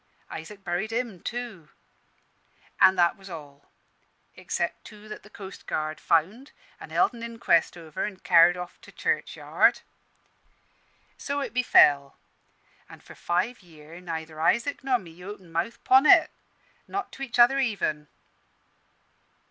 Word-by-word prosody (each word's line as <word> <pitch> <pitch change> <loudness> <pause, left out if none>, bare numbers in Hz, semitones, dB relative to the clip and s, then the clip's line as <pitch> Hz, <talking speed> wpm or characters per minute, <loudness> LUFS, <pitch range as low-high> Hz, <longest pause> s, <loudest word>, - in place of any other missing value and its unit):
Isaac 195 +5 -9
buried 180 +6 -2
him 230 -5 -3
too. 230 -10 -6 1.1
An' 190 - +7
that 175 -2 +3
was 195 0 -13
all, 145 -4 -11 0.7
except - - -3
two 210 0 -13
that 215 - -8
the 210 - -17
coastguard 155 -6 -5
found 195 - 0 0.3
an' - - -10
held 385 - +2
an 235 - -10
inquest 230 -8 +1
over 160 -2 -6
an' 210 -2 -6
carr'd 175 -1 +5
off 180 0 -8
to - - -15
churchyard. - - +1 1.4
"So 285 0 -3
it 275 - -5
befell; 145 - +4 0.7
an' - - -13
for - - -14
five 185 +8 -2
year' 165 -1 -14
neither 160 -2 -6
Isaac 235 - +1
nor 260 -2 +2
me 180 -4 -13
opened 190 -4 -10
mouth 170 +8 -3
'pon 265 +3 +5
it, - - +7 0.6
not 395 0 -4
to - - -12
each 255 -3 -4
other 245 +3 +6
even. 195 - -1
190 Hz, 135 wpm, -26 LUFS, 165-235 Hz, 1.4 s, An